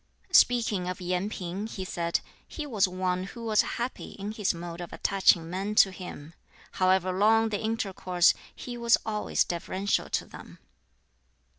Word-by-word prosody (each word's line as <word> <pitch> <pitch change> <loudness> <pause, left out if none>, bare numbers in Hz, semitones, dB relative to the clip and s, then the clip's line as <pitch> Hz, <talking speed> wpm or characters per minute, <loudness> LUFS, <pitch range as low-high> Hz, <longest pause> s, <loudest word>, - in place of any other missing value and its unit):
Speaking 225 -7 +4
of 185 - -4
Yen 180 +2 -1
Ping, 190 +1 -5
he 190 -4 -6
said, 170 -2 -1 0.3
"He 305 - -6
was 215 -9 +2
one 185 0 -2
who 230 +4 -9
was 215 -1 +4 0.2
happy 245 +2 -4
in 200 +1 -5
his 210 -2 0
mode 170 0 -7
of 175 - -7
attaching 185 -4 +3
men 195 +4 -3
to 195 - +6
him. 175 -4 -9 0.4
However 185 0 +2
long 220 +4 +3
the 205 -2 -2
intercourse, 195 -5 +2 0.2
he 245 -1 -7
was 235 0 +4
always 210 -1 +1
deferential 185 +3 -2
to - - -1
them." - - -12
190 Hz, 155 wpm, -28 LUFS, 180-215 Hz, 0.4 s, to